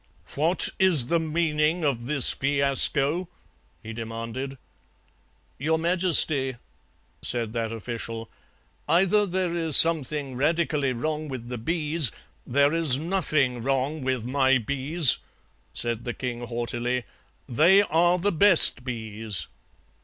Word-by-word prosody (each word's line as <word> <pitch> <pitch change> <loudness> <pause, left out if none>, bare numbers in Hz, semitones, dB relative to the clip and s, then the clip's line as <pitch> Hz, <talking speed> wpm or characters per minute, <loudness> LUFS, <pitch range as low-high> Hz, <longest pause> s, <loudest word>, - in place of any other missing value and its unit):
"'What 160 +6 +1
is 165 -10 +4
the 170 - +1
meaning 160 0 -1
of 120 -4 -2
this 145 -3 +5
fiasco?' 140 +4 +3 0.6
he 110 0 -8
demanded. 115 +4 -7 1.0
"'Your 160 +4 0
Majesty,' 160 -6 +2 0.7
said 115 -3 -2
that 115 -1 -3
official, 115 0 -7 0.6
'either 195 +6 +2
there 180 -1 -2
is 165 -4 +4
something 150 -4 +3
radically 150 -1 -1
wrong 155 +5 -4
with 125 -4 -8
the 125 -2 -6
bees 155 - -1 0.2
' - - -38
"'There 140 +4 +1
is 160 -6 +1
nothing 155 -7 -1
wrong 135 +4 -2
with 130 -3 -3
my 135 +1 +1
bees,' 140 +5 +2 0.5
said 120 -1 -3
the 120 - -6
king 120 -2 -6
haughtily, 120 +1 -3 0.4
'they 175 - +4
are 175 0 +1
the 200 +3 -1
best 170 -7 +4
bees.' 110 - -3
140 Hz, 120 wpm, -24 LUFS, 120-165 Hz, 1.0 s, this